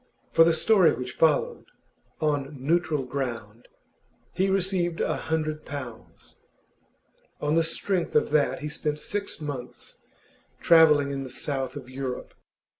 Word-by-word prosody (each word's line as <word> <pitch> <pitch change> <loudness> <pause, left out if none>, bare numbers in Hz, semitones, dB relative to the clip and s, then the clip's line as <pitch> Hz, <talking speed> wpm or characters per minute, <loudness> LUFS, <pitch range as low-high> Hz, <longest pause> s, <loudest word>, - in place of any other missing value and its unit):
For 165 - +6
the 165 - +4
story 185 +1 +4
which 125 +1 -5
followed, 155 -3 +1 0.6
'On 145 -2 -1
Neutral 155 0 0
Ground,' 120 -4 -5 0.7
he 190 +1 +1
received 185 -3 0
a - - 0
hundred 155 -1 -2
pounds. 130 -7 -9 1.0
On 150 0 0
the 165 - +4
strength 170 +2 -2
of 150 - +2
that 150 -1 +1
he 150 - -3
spent 150 0 -2
six 200 +5 -4
months 140 -5 -7 0.6
travelling 150 -4 +5
in 135 -1 -3
the 130 - -8
South 135 +1 -3
of 135 -3 -8
Europe. 130 -1 -6
150 Hz, 130 wpm, -26 LUFS, 135-165 Hz, 1.0 s, For